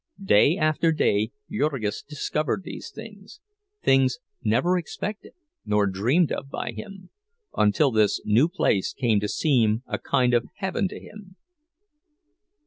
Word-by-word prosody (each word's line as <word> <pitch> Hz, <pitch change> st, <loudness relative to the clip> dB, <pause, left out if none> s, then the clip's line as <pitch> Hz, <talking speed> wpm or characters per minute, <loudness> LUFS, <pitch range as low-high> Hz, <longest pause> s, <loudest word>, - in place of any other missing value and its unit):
Day 150 Hz, -, +4 dB
after 155 Hz, +1 st, +2 dB
day 110 Hz, -8 st, +1 dB, 0.2 s
Jurgis 135 Hz, -, -1 dB
discovered 150 Hz, +4 st, -2 dB
these -, -, -8 dB
things—things 220 Hz, -, -2 dB, 0.3 s
never 125 Hz, +12 st, +2 dB
expected 200 Hz, +4 st, -5 dB, 0.3 s
nor 105 Hz, -1 st, +2 dB
dreamed 120 Hz, -, +1 dB
of 135 Hz, -, -4 dB
by 120 Hz, -, -4 dB
him—until 195 Hz, -, -2 dB
this 110 Hz, -2 st, +2 dB
new 120 Hz, +10 st, +3 dB
place 105 Hz, -, 0 dB
came 115 Hz, -6 st, +1 dB
to 105 Hz, -, -2 dB
seem 115 Hz, -4 st, +1 dB
a -, -, -4 dB
kind 125 Hz, -1 st, +1 dB
of 120 Hz, 0 st, +2 dB
a -, -, -17 dB
heaven 190 Hz, 0 st, -1 dB
to -, -, -9 dB
him. 200 Hz, -3 st, -13 dB
150 Hz, 130 wpm, -25 LUFS, -, 0.3 s, Day